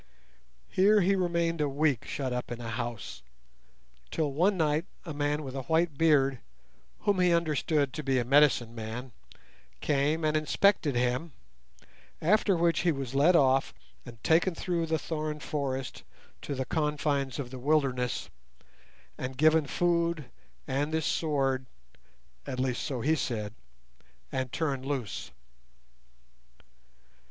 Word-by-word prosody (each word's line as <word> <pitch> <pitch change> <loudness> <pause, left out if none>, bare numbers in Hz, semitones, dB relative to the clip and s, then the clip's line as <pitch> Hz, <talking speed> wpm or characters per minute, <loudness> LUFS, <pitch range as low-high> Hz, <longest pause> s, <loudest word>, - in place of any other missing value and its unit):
Here 205 +3 +5
he 195 +2 +3
remained 170 -3 0
a 145 - +1
week 140 -3 +1
shut 130 -3 -3
up 125 0 -4
in 120 - -4
a 115 -1 -5
house, 120 - -5 0.9
till 150 -4 -1
one 185 +7 +2
night 155 +1 +1 0.2
a 160 - -5
man 145 +1 -1
with 135 -1 -7
a 135 - -2
white 160 +2 +1
beard, 140 -4 +3 0.6
whom 205 -3 +1
he 180 -1 +4
understood 155 -4 +1
to 155 - -4
be 135 -3 +1
a 120 - +1
'medicine 135 -3 +4
man', 115 +3 -6 0.7
came 150 +3 +1
and 155 0 +1
inspected 155 -1 +2
him, 125 +6 0 0.9
after 195 +2 +3
which 170 0 +2
he 175 - +2
was 135 -4 -4
led 150 +6 +5
off 135 -3 +3 0.3
and 115 -4 -12
taken 170 +2 +3
through 170 -1 -1
the 160 0 +1
thorn 155 -1 -4
forest 135 -3 -3 0.4
to 140 - -4
the 130 0 -2
confines 145 -3 -1
of 130 -4 -5
the 130 - -7
wilderness, 130 -3 0 0.9
and 130 0 -5
given 155 +1 +4
food 170 -5 0 0.4
and 140 +3 -1
this 160 -1 0
sword 135 -4 0 0.8
(at 130 - -4
least 130 -1 0
so 135 -6 -3
he 155 +6 +2
said), 110 -7 -3 0.8
and 130 -2 -2
turned 140 -5 -1
loose." 130 - -4
145 Hz, 140 wpm, -29 LUFS, 130-160 Hz, 0.9 s, Here